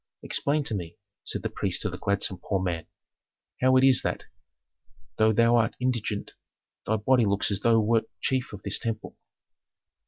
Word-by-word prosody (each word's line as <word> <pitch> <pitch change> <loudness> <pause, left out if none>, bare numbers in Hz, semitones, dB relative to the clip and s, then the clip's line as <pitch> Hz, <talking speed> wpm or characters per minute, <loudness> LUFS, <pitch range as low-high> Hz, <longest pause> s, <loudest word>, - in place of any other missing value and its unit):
'Explain 145 +1 0
to 120 - -1
me,' 85 -5 -5 0.3
said - - -1
the - - -1
priest - - -1
to - - 0
the - - -7
gladsome 100 -2 0
poor 95 - 0
man, 85 -3 -3 0.7
'how 130 0 +4
it 130 - +4
is 135 -1 +6
that, - - -3 0.9
though 110 0 +4
thou 115 +2 +4
art 115 -2 +2
indigent, 120 -5 -2 0.5
thy 110 - +2
body 120 +3 +3
looks 100 +1 0
as 100 - -1
though 115 - +3
thou 115 - +5
wert 115 +1 +2
chief 130 -1 -1
of 100 -1 -10
this 100 - 0
temple.' 115 -2 -4
110 Hz, 180 wpm, -27 LUFS, 100-125 Hz, 0.9 s, is